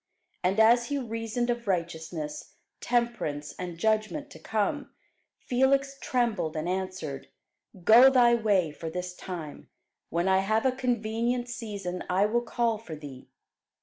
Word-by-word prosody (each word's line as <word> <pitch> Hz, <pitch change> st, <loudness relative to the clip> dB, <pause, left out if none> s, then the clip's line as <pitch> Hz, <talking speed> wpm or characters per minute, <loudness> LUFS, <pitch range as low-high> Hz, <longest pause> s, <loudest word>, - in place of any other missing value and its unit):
And 190 Hz, +4 st, +1 dB
as 235 Hz, +2 st, +5 dB
he 285 Hz, -, -1 dB
reasoned 230 Hz, -1 st, -2 dB
of 235 Hz, -2 st, -4 dB
righteousness, 160 Hz, -4 st, -3 dB, 0.2 s
temperance, 235 Hz, -12 st, -1 dB
and 175 Hz, -2 st, -5 dB
judgment 220 Hz, -, 0 dB
to -, -, -11 dB
come, 220 Hz, +7 st, -1 dB, 0.5 s
Felix 275 Hz, +2 st, +1 dB
trembled, 215 Hz, -11 st, 0 dB
and 155 Hz, +2 st, -2 dB
answered, 185 Hz, -7 st, -4 dB, 0.6 s
Go 240 Hz, +7 st, +9 dB
thy 245 Hz, -3 st, +5 dB
way 205 Hz, -8 st, +2 dB
for 160 Hz, +2 st, -6 dB
this 180 Hz, +2 st, -5 dB
time; 175 Hz, -5 st, -8 dB, 0.4 s
when 170 Hz, +2 st, 0 dB
I 190 Hz, 0 st, +4 dB
have 215 Hz, +5 st, +1 dB
a 260 Hz, -, +4 dB
convenient 240 Hz, -1 st, -1 dB
season, 200 Hz, -7 st, -5 dB
I 185 Hz, +3 st, +3 dB
will 235 Hz, +3 st, +1 dB
call 235 Hz, -2 st, 0 dB
for 175 Hz, -8 st, -8 dB
thee. 140 Hz, -4 st, -11 dB
215 Hz, 140 wpm, -28 LUFS, 180-240 Hz, 0.6 s, Go